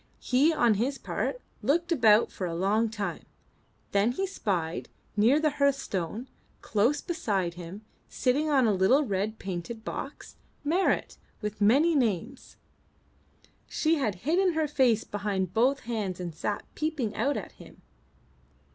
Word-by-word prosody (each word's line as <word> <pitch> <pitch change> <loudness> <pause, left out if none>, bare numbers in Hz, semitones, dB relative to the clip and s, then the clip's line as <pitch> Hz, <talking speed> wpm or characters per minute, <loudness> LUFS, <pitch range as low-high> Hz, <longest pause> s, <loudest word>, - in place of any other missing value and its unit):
He 270 +6 +3
on 240 -8 +3
his 270 +3 0
part, - - -3 0.2
looked 335 +9 +1
about 230 -7 +5
for 185 - -4
a 165 - -4
long 210 +6 +2
time. 210 -2 -4 0.7
Then 200 +4 +2
he 385 +9 -1
spied 180 - -2 0.3
near 230 +8 +4
the 310 -1 +2
hearthstone, 245 - 0 0.4
close 225 +7 +1
beside 205 - -1
him, 180 +5 -9 0.2
sitting 280 +5 +1
on 270 -4 +4
a 215 - +3
little 195 +10 +4
red 205 0 -2
painted 195 +5 -6
box, - - -6 0.3
Marit 345 +6 +1 0.2
with 210 -1 -5
the 205 - +3
many 290 +10 +5
names. 235 - -1 1.1
She 315 +1 +1
had 225 -9 0
hidden 355 +4 +3
her 315 -1 +1
face 250 -6 +3
behind 195 -3 -2
both 260 +6 +2
hands 210 -6 -3
and 175 -2 -5
sat 205 +6 -3
peeping 300 -9 -2
out 285 +1 0
at - - -6
him. - - -16
230 Hz, 145 wpm, -28 LUFS, 200-285 Hz, 1.1 s, about